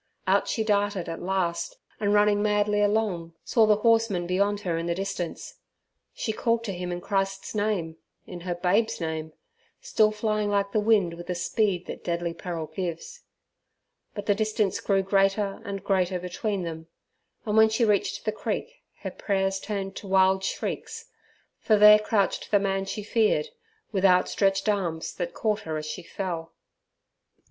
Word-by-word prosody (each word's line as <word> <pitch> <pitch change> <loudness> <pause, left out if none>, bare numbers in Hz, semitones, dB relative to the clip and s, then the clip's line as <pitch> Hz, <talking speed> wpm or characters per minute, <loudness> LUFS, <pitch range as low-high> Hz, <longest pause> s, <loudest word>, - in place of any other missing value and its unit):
Out - - +2
she 220 - 0
darted 205 -3 0
at 165 - -5
last, 175 -2 -1 0.2
and 205 -1 +1
running 205 0 +4
madly 210 0 +2
along, 205 -6 0
saw 225 -3 +3
the 210 - +5
horseman 225 -6 +3
beyond 200 +3 +1
her 175 -4 -1
in 165 +1 -2
the 170 - 0
distance. 190 -2 -5 0.5
She 220 - -3
called 230 +1 0
to 205 -4 -3
him 180 0 -4
in 175 0 -4
Christ's 195 +1 -2
name, 205 -7 -1 0.3
in 180 - -8
her 175 0 -3
babe's 195 +6 +1
name, 160 -1 -3 0.5
still 220 - +2
flying 215 -1 -1
like 200 -1 +1
the 215 - +2
wind 210 -5 +3
with 175 +1 -9
the 180 - -2
speed 185 0 0
that - - -8
deadly 170 0 -2
peril 170 -2 -5
gives. 190 - -5 0.9
But 205 -1 -5
the 205 - +3
distance 215 -1 0
grew 195 -1 +1
greater 195 +1 +1
and 195 -1 -5
greater 185 -2 +1
between 185 +2 -3
them, 160 -1 -6 0.6
and 210 -1 -1
when 220 0 +7
she 220 +2 +2
reached 205 -2 0
the - - +1
creek - - -4 0.2
her - - -4
prayers 195 -1 -1
turned 195 -1 -4
to 200 - -8
wild 190 0 +3
shrieks, 455 - -4 0.5
for 215 - +3
there 210 0 +9
crouched 210 -2 0
the 205 - +5
man 195 -1 0
she 200 +2 -5
feared, 210 -8 +1 0.4
with 195 -3 -1
outstretched 195 +1 +3
arms 175 -6 -1
that 175 -1 -4
caught 215 -1 0
her 160 -6 -4
as 155 - -5
she 155 - -5
fell. 170 -2 -5
195 Hz, 170 wpm, -26 LUFS, 180-210 Hz, 0.9 s, there